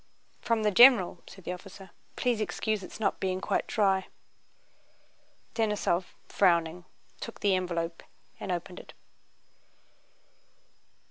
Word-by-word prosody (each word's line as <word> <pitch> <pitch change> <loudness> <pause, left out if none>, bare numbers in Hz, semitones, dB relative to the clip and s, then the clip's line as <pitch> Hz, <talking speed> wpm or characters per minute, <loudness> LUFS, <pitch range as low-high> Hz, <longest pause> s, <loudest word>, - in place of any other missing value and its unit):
"From 230 -2 0
the 210 - +3
general," 215 -6 +6
said 190 - -13
the 180 - -3
officer. 195 0 -11 0.2
"Please 240 -3 0
excuse 215 +2 -1
its 185 - -10
not 205 -3 0
being 185 -1 -1
quite - - -1
dry." 195 -3 +1 1.5
Denísov, 210 -5 0 0.2
frowning, 175 -2 +2 0.3
took 230 - -8
the 200 -1 +3
envelope 170 -2 -2 0.4
and 190 - -4
opened 180 +1 -4
it. - - -13
190 Hz, 115 wpm, -29 LUFS, 180-215 Hz, 1.5 s, general